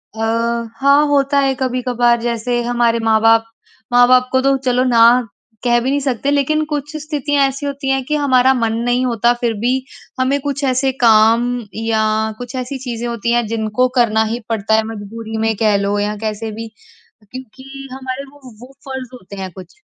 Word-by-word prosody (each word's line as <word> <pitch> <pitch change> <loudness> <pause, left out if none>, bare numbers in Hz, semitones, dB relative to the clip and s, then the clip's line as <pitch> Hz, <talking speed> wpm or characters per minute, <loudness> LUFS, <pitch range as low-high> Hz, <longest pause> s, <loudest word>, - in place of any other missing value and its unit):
अ, - - -9 0.6
हाँ, 280 +2 +4
होता 280 0 +2
है 270 -1 +2
कभी-कभार। 245 -2 0
जैसे 240 +1 -1
हमारे 235 -1 +1
माँ-बाप 225 0 +4 0.5
माँ-बाप 250 +1 +5
को 260 0 +2
तो 275 0 +2
चलो 255 -1 0
ना 240 -3 +3 0.6
कह 240 -1 +3
भी 255 - -1
नहीं 285 +1 +1
सकते 275 0 -1
लेकिन 295 +2 +1
कुछ 295 0 -5
स्थितियाँ 290 -2 0
ऐसी 275 +2 -5
होती 280 -1 -4
हैं 270 -1 +1
कि 300 - -1
हमारा 265 -3 +3
मन 230 -3 0
नहीं 245 +1 +1
होता 235 0 +2
फिर 235 -2 0
भी 240 +3 +1 0.5
हमें 265 +2 +1
कुछ 280 0 -3
ऐसे 265 0 +1
काम 225 +1 +5 0.3
या 225 0 0 0.4
कुछ 245 +1 -8
ऐसी 255 +2 -4
चीज़ें 240 -2 -5
होती 235 0 -2
हैं 240 -1 +1
जिनको 220 +2 0
करना 220 -3 +3
ही 225 +2 -3
पड़ता 220 -1 +1
है। 220 - +2
मजबूरी 220 +1 -7
में 225 -1 +1
कह 215 -2 +2
लो 200 +1 -1
या 210 +1 -1
कैसे 220 0 -4
भी 225 +1 -7 0.6
क्योंकि 265 +2 -10
हमारे 260 +1 -5
वो 290 - -19 0.2
वो 250 +3 -13 0.2
फ़र्ज़ 265 -2 -6
होते 200 -5 -11
हैं 190 -1 -6
कुछ। 185 +2 -13
245 Hz, 180 wpm, -17 LUFS, 225-270 Hz, 0.6 s, माँ-बाप